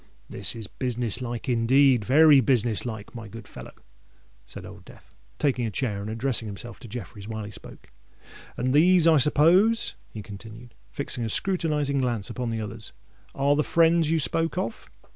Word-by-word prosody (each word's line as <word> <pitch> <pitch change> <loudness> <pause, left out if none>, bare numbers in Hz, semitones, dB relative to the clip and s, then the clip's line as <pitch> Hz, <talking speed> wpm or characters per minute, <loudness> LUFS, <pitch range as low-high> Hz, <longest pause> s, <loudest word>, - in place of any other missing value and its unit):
"This - - -4
is 115 -2 -6
business 120 0 -3
like 120 -2 -5
indeed—very 135 +4 +5
business 120 -3 +1
like, 110 -3 -7
my 115 -3 -8
good 115 +1 -11
fellow," - - -11 0.7
said 90 - -9
Old 95 0 -12
Death, - - -17 0.2
taking 130 -5 0
a - - -2
chair, 105 -2 -2
and 105 - -6
addressing 115 0 -1
himself 110 +3 -8
to 120 - -11
Jeffreys 105 -2 -8
while 110 -1 -5
he 105 - -8
spoke. 100 - -12 0.7
"And 130 +1 0
these, 175 +3 +5
I 165 -2 +6
suppose," 175 - +3 0.2
he 105 - -8
continued, 115 +4 -11 0.2
fixing 140 -3 -4
a 115 - -2
scrutinizing 150 - 0
glance 120 -5 -1
upon 125 -2 -3
the 115 -1 -3
others, 110 0 -6 0.4
"are 140 +1 +2
the 150 - +1
friends 165 -1 +3
you 165 0 +2
spoke 165 +3 0
of." 115 -11 -4
125 Hz, 170 wpm, -25 LUFS, 110-145 Hz, 0.7 s, I